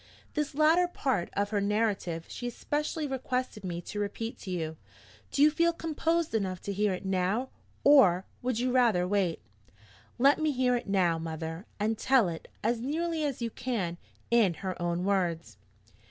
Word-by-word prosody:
This 300 -2 -2
latter 320 +4 +4
part 260 - -1
of 205 +1 -1
her 205 -2 +1
narrative 200 -5 0
she 245 - -5
especially 300 +5 -2
requested 255 -5 -3
me 175 -2 -4
to 205 - -6
repeat 215 +3 -3
to 195 - -8
you. 160 -3 -3 0.5
Do 285 - +3
you 305 - +7
feel 335 +2 +3
composed 330 0 -1
enough 190 -5 -1
to 200 - -4
hear 205 +1 +1
it 185 - -6
now? 190 +7 0 0.3
Or 195 -11 +6 0.2
would 250 -2 -1
you 250 +2 0
rather 230 -8 +3
wait?" 185 - 0 0.7
"Let 275 +4 +5
me 310 -1 +1
hear 250 -1 +2
it 240 - -3
now, 180 -4 +2
mother; 165 +2 -5
and 215 +1 0
tell 260 -8 +4
it, 165 -1 -7 0.2
as 230 +1 +1
nearly 320 +4 -1
as 275 -5 -2
you 230 - -2
can, 190 -11 -3 0.3
in 220 -7 +4
her 185 +2 -4
own 175 0 -1
words." 170 - -1
215 Hz, 170 wpm, -29 LUFS, 180-265 Hz, 0.7 s, you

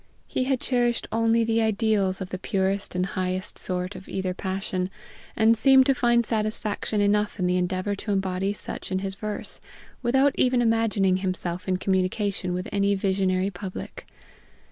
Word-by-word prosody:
He 255 - -1
had 265 -1 +1
cherished 240 -2 0
only 230 +1 +3
the 225 0 +1
ideals 215 -3 +1
of 185 - -4
the 185 - -5
purest 195 -1 -1
and 180 0 +1
highest 185 0 -3
sort 180 +1 -2
of 190 - -10
either 190 -1 -2
passion, 185 -1 -3 0.5
and 225 +1 +5
seemed 265 +3 +6
to 275 - +4
find 240 -2 +2
satisfaction 215 -1 -1
enough 210 +1 +1
in 185 - 0
the 180 0 +2
endeavor 185 +2 -1
to 210 - -4
embody 190 0 0
such 205 - -4
in 185 - +1
his 195 0 -3
verse, 210 +2 -5 0.4
without 265 +3 +3
even 250 -1 +3
imagining 225 -5 +2
himself 185 -1 -3
in 185 -1 +1
communication 190 0 0
with 180 +3 -3
any 200 0 +2
visionary 190 0 +1
public. 190 0 -7
200 Hz, 165 wpm, -25 LUFS, 185-225 Hz, 0.5 s, seemed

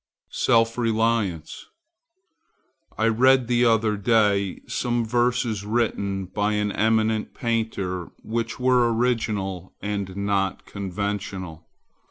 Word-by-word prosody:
SELF 115 +1 +2
RELIANCE 110 -7 -1 1.3
I 110 - +2
read 130 +3 +4
the 120 +1 +2
other 110 -2 +3
day 100 -2 +2
some 120 -1 -1
verses 120 -2 0
written 100 -3 -1
by 105 +3 -1
an 105 0 0
eminent 110 0 +1
painter 110 -7 -2
which 115 +2 -3
were 125 -2 +3
original 105 -6 -1
and 100 -2 -4
not 100 -1 -1
conventional. 95 -4 -5
110 Hz, 100 wpm, -24 LUFS, 100-115 Hz, 1.3 s, read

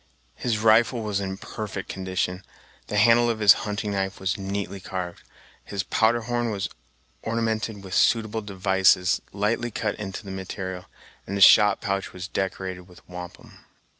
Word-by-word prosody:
His 120 -3 -1
rifle 115 +2 +4
was 105 -2 -1
in 95 -1 -4
perfect 100 -2 -6
condition, 95 0 -3 0.4
the 105 - -2
handle 120 +3 +5
of 115 - 0
his 105 -2 +8 0.2
hunting 105 0 -2
knife 95 -1 -2
was 95 0 -1
neatly 100 0 -4
carved, 90 -2 -5 0.4
his 100 -1 -3
powder 115 +1 +2
horn 120 0 -1
was 100 -3 -2 0.5
ornamented 110 -2 -2
with 95 -1 -8
suitable 110 0 +2
devices 95 -2 +2
lightly 110 +4 -1
cut 110 -1 -2
into 100 0 -6
the 95 - -7
material, 95 -1 -5 0.4
and 100 - -3
his 100 - +6
shot 105 -1 +6
pouch 100 -1 -2
was 90 0 -6
decorated 95 -2 -4
with 90 - -18
wampum. 90 -1 -10
100 Hz, 155 wpm, -25 LUFS, 95-110 Hz, 0.5 s, his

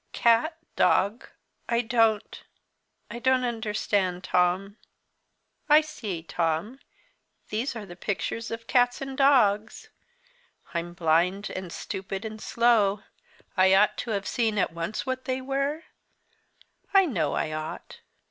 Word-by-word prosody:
"Cat 235 +8 +3 0.2
dog? 205 +6 +2 0.4
I 235 0 +2
don't 225 -3 +1 0.7
I 235 - -6
don't 260 0 +2
understand, 210 -5 -1
Tom 185 +3 +1 0.9
I 300 +1 +8
see, 215 - -6
Tom, 170 +9 -2 0.7
these 235 +5 -2
are 220 -2 -6
the 175 -2 -11
pictures 220 +4 -3
of 230 0 -6
cats 245 0 +2
and 270 -1 -5
dogs. 230 -7 +3 0.8
I'm 170 0 -4
blind, 175 +5 +1
and 185 -2 -6
stupid, 190 +4 -5
and 215 0 -7
slow. 215 -4 +2 0.5
I 190 0 +5
ought 205 +2 +4
to - - -5
have 200 -2 -2
seen 225 -3 0
at 180 -4 +1
once 170 +6 -4
what 260 0 -3
they 260 -1 -1
were? 275 +4 -2 1.1
I 390 -1 +7
know 170 - -1
I 155 - -1
ought. 155 0 -6
215 Hz, 130 wpm, -26 LUFS, 185-245 Hz, 1.1 s, I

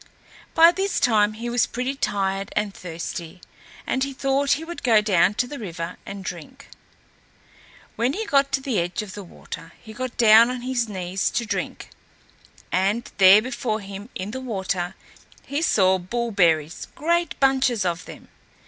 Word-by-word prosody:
By 330 +1 +8
this 390 +2 -1
time 215 -3 +3
he 230 +2 -6
was 240 0 +1
pretty 250 +2 -3
tired 195 -6 -2
and 210 -1 -1
thirsty, 170 0 -7 0.5
and 260 - 0
he 275 0 -3
thought 275 +1 +1
he 315 - -3
would 345 +1 -7
go 230 -4 +5
down 200 -2 +3
to 245 - +1
the 285 +3 -8
river 170 -6 -6
and 195 -1 -7
drink. 215 - -8 1.3
When 240 +4 +1
he 445 +6 -3
got 275 -6 +2
to 270 - +1
the 260 -7 -1
edge 175 +4 -2
of 195 -3 -9
the 205 - -7
water 170 -1 -10
he 220 - -12
got 255 +1 -5
down 225 +1 +7
on 250 -1 -4
his 245 -3 -1
knees 185 -1 -2
to 235 - -2
drink, 200 -4 -4 0.8
and 200 +6 0
there 195 +2 +8
before 240 -3 -2
him 200 +2 -9
in 190 +3 -4
the 260 +3 -5
water 190 -7 -3 0.5
he 285 +3 -2
saw 190 - +3
bullberries, 180 -7 0
great 340 +2 0
bunches 265 -6 +2
of 175 0 -2
them. - - -12
220 Hz, 165 wpm, -23 LUFS, 190-260 Hz, 1.3 s, By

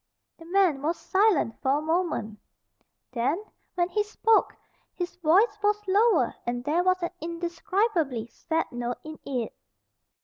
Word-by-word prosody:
The 330 - -12
man 350 -5 +2
was 325 +4 0
silent 380 - +2
for 265 - +2
a - - -2
moment. 320 - -1 0.7
Then, 265 - 0 0.3
when 350 -1 +2
he 420 +3 0
spoke, 430 +1 +2 0.4
his 355 0 -4
voice 370 +7 +4
was 420 0 +1
lower 395 - +3
and 245 0 -3
there 310 +6 +1
was 370 -1 +2
an 345 - -1
indescribably 340 - -1
sad 320 +7 -2
note 240 0 -3
in 310 0 -9
it. 250 -5 -3
340 Hz, 140 wpm, -27 LUFS, 275-390 Hz, 0.7 s, voice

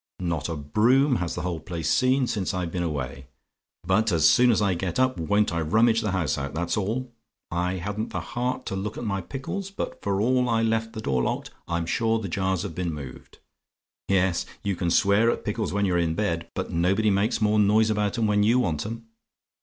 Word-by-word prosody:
Not 85 -4 -2
a 80 - -2
broom 120 - +3
has 85 -2 -3
the - - -3
whole 90 -3 -2
place 80 0 -5
seen 130 +1 +3
since 105 -6 -2
I've 90 -2 -2
been 90 - -2
away. 70 -5 -4 0.6
But 105 +5 +2
as 80 -3 +4
soon 125 +10 +5
as 115 - +3
I 100 -3 +2
get 90 +3 -3
up, 130 -6 +2
won't 105 +4 +1
I 85 - 0
rummage 115 +7 +3
the 105 - -1
house 90 -9 0
out, 70 +1 -5
that's 85 +1 -1
all! 115 +5 -2 0.4
I 90 +2 0
hadn't 100 +4 -3
the - - -3
heart 125 +1 -3
to - - -3
look 100 +2 -4
at - - -5
my 100 -3 -1
pickles; 140 - -5
but 195 - -5
for 100 -1 -1
all 125 +3 +2
I 115 -1 +2
left 115 0 0
the 110 - -5
door 65 -9 0
locked, - - -2 0.2
I'm 85 0 -1
sure 115 +6 +1
the 110 -3 -4
jars 95 0 -1
have - - -5
been 90 0 -2
moved. 70 -4 -10 0.7
Yes; 95 -2 +1 0.2
you 100 -1 -1
can 85 0 -1
swear 100 +6 +4
at - - -2
pickles 110 +1 -2
when 100 0 +1
you're 90 -2 +1
in 80 -1 0
bed; 85 -5 -2
but - - -3
nobody 95 +6 +2
makes 100 +5 +1
more 105 -1 +2
noise 110 +2 +4
about 105 +2 0
'em 115 - +1
when 105 -1 +2
you 115 +4 +4
want 85 -7 0
'em. 115 +1 -7
100 Hz, 220 wpm, -25 LUFS, 85-115 Hz, 0.7 s, soon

